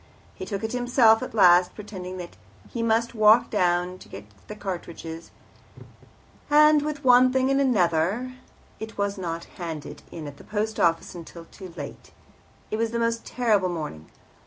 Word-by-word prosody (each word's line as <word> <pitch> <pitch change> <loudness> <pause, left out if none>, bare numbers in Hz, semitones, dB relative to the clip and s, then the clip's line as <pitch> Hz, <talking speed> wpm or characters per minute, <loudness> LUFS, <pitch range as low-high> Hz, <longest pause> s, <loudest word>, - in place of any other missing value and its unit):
He - - -8
took 200 0 -4
it 220 - -2
himself 245 -2 +4
at - - -6
last, 180 -3 +5
pretending 185 -3 -8
that 175 -1 -8 0.3
he 235 - -5
must 230 +1 +1
walk 220 +2 +5
down 180 -2 0
to - - -15
get 100 +1 -10 0.3
cartridges, 170 -4 -7 1.2
and, 300 0 +6
what 300 0 -2
with 290 - -16
one 250 0 +6
thing 260 +1 +1
and 275 -2 +2
the - - +2
other, 180 +9 0 0.5
it 220 0 -8
was 200 0 -2
not 170 -2 -4 0.2
handed 155 -4 -6
in 160 -2 -7
at 145 -1 -9
the - - -14
Post 215 +1 -3
Office 165 -1 +1
until 170 -1 -10
too 185 +1 -12
late. - - -8 0.6
It 215 - -1
was 230 0 0
the 235 - -3
most 230 0 -1
terrible 215 -7 +1
morning. 150 - -6
205 Hz, 170 wpm, -25 LUFS, 175-235 Hz, 1.2 s, and